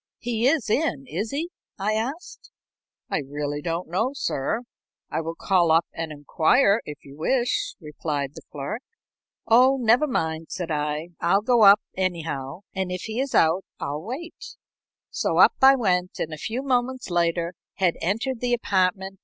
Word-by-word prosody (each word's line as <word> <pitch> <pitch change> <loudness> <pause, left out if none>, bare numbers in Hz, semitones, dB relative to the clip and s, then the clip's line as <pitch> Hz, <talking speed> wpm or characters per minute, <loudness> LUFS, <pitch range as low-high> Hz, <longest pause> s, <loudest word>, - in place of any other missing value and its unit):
"He 235 0 0
is 280 -5 +2
in, 275 +3 0
is 210 -1 -3
he?" 320 +7 -3 0.3
I 205 +2 0
asked. 255 +10 -4 0.6
"I - - +1
really 145 +1 -4
don't 170 +2 -3
know, 220 - 0
sir. 180 - -1 0.5
I - - -1
will 165 +1 -5
call 175 -4 +2
up 165 +1 +4
and 165 -1 -4
inquire, 200 - +3
if 150 - -9
you 140 0 -12
wish," 240 - 0
replied 150 -3 -3
the - - -10
clerk. 145 - -5 0.6
"Oh, 255 +4 +5
never 245 +5 +4
mind," 160 - -2
said 175 -3 -4
I. 150 +2 -2
"I'll 195 +4 +2
go 240 -1 +3
up, 200 +1 +8
anyhow, 165 -5 -3
and 190 -1 -2
if 180 - -3
he 225 +2 -4
is 275 0 -2
out, 165 +4 +4 0.2
I'll 145 +2 -3
wait." 335 - -8 0.6
So - - -1
up - - +7
I 270 +1 +8
went, 180 -7 0
and 160 - -3
a - - -5
few 235 - -4
moments 255 -4 -1
later 170 0 +1 0.2
had 185 -4 +2
entered 225 +8 -1
the 245 -1 0
apartment. 190 -3 0
190 Hz, 165 wpm, -24 LUFS, 160-245 Hz, 0.6 s, up